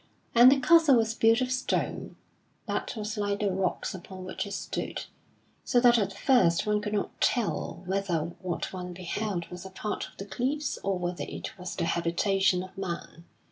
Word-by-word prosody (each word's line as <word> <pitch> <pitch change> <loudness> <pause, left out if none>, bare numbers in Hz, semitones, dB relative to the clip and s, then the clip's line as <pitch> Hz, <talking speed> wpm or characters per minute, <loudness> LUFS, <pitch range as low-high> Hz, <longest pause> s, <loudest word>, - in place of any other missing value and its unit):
And 240 +2 +9
the 275 - +4
castle 315 +1 +6
was 225 -1 +2
built 225 +2 +4
of 255 0 -1
stone, 255 0 -2 0.5
that - - -3
was 215 0 -4
like 205 0 0
the 205 -2 +1
rocks 185 -1 -1
upon 185 0 -9
which 185 - -4
it 200 - -6
stood, - - -4 0.6
so 245 - +3
that 240 -1 +6
at 200 -2 0
first 195 -8 +3
one 210 0 +1
could 210 0 -4
not 205 - -3
tell 210 -6 0
whether 175 -4 -1
what 185 0 -3
one 180 -1 -5
beheld 185 +1 -3
was 180 0 -7
a 190 - -8
part 205 +2 -4
of - - -20
the 195 - -6
cliffs 260 +9 -2
or 195 -1 0
whether 175 -4 -3
it 85 0 -6
was 180 +1 -5
the 170 - -1
habitation 180 +3 +1
of 185 - -12
man. 170 -3 -6
195 Hz, 185 wpm, -28 LUFS, 180-225 Hz, 0.6 s, And